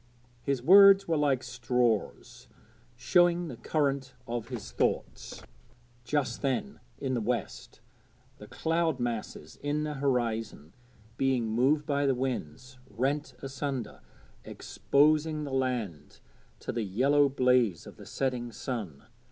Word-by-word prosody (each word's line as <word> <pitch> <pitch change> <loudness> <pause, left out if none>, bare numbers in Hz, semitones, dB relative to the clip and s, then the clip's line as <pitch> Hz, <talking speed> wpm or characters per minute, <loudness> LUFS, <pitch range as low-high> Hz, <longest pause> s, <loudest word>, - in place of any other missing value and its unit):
His 135 -3 -2
words 195 +4 +8
were 165 - +1
like 140 -4 +1
straws, 125 -3 -2 0.5
showing 175 -1 +2
the - - -7
current 140 -4 -1
of 115 -1 -4
his 115 - -7
thoughts. - - -2 0.6
Just 145 +2 -1
then 140 +10 -2 0.2
in 135 -2 -3
the 120 - 0
west 115 0 -4 0.6
the - - -11
cloud 165 -3 -1
masses 115 -10 -5
in 145 +1 -1
the 150 0 -3
horizon, 115 - -2 0.4
being 130 -3 +1
moved 135 +7 +2
by 140 -1 0
the 135 - +2
winds, 130 - -5
rent 135 +7 -2
asunder, 135 -2 -4 0.4
exposing 155 +2 +1
the 140 -2 -6
land 125 - -3 0.4
to - - -4
the 120 - -2
yellow 135 +8 +2
blaze 125 - +2
of - - -12
the - - -12
setting 125 -3 -2
sun. 105 - -6
130 Hz, 125 wpm, -29 LUFS, 120-145 Hz, 0.6 s, words